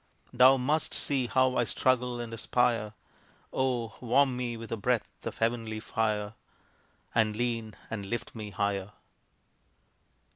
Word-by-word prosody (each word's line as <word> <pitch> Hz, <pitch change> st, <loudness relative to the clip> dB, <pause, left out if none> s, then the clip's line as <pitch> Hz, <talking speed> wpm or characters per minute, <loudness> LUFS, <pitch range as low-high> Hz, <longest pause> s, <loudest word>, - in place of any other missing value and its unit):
Thou 130 Hz, +2 st, +7 dB
must 145 Hz, +5 st, 0 dB
see 135 Hz, -4 st, +1 dB
how 130 Hz, +1 st, +3 dB
I -, -, +4 dB
struggle 125 Hz, +1 st, +1 dB
and 115 Hz, -1 st, -5 dB
aspire 115 Hz, -2 st, +1 dB, 0.6 s
Oh, 125 Hz, -4 st, 0 dB
warm 130 Hz, +2 st, +3 dB
me 120 Hz, -2 st, -3 dB
with 115 Hz, 0 st, -9 dB
a -, -, +1 dB
breath 115 Hz, +2 st, -2 dB
of -, -, -5 dB
heavenly 115 Hz, -1 st, -1 dB
fire, 105 Hz, -2 st, -1 dB, 0.8 s
And 110 Hz, -2 st, +2 dB
lean, 115 Hz, -2 st, -2 dB, 0.2 s
and 100 Hz, -3 st, -4 dB
lift 120 Hz, +4 st, -4 dB
me 110 Hz, -2 st, -6 dB
higher. 100 Hz, 0 st, -2 dB
115 Hz, 135 wpm, -29 LUFS, 110-125 Hz, 0.8 s, Thou